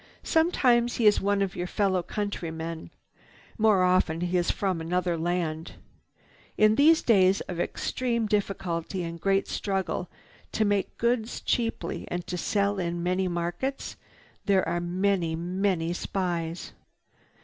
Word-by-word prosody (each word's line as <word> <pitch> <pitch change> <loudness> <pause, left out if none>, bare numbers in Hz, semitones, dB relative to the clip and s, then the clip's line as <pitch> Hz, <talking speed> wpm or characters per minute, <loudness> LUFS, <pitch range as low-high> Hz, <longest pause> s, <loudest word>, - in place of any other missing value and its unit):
"Sometimes 250 -8 +3
he 230 - 0
is 210 - +5
one 200 0 +2
of 190 - -4
your 180 - -3
fellow 190 -2 +1
countrymen. 165 -5 -4 0.7
More 210 -4 +4
often 180 -3 +2
he 175 +1 -1
is 175 -1 +2
from 185 -4 -1
another 175 +1 0
land. 165 -1 -2 0.8
In 215 0 +5
these 315 +7 +5
days 195 -4 +4
of 175 -2 -6
extreme 235 +5 -1
difficulty 190 -4 -2
and 170 0 -6
great 195 0 +2
struggle 190 -2 -2 0.4
to 220 - +2
make 205 -2 0
goods 235 -1 0
cheaply 230 -7 -2
and 175 0 -4
to 180 - -4
sell 200 +2 0
in 170 -1 -2
many 185 +1 0
markets, 175 +10 -3 0.5
there 195 -4 +3
are 175 +1 -1
many, 180 -1 0
many 175 0 -1
spies. 175 -2 -3
185 Hz, 135 wpm, -27 LUFS, 175-205 Hz, 0.8 s, is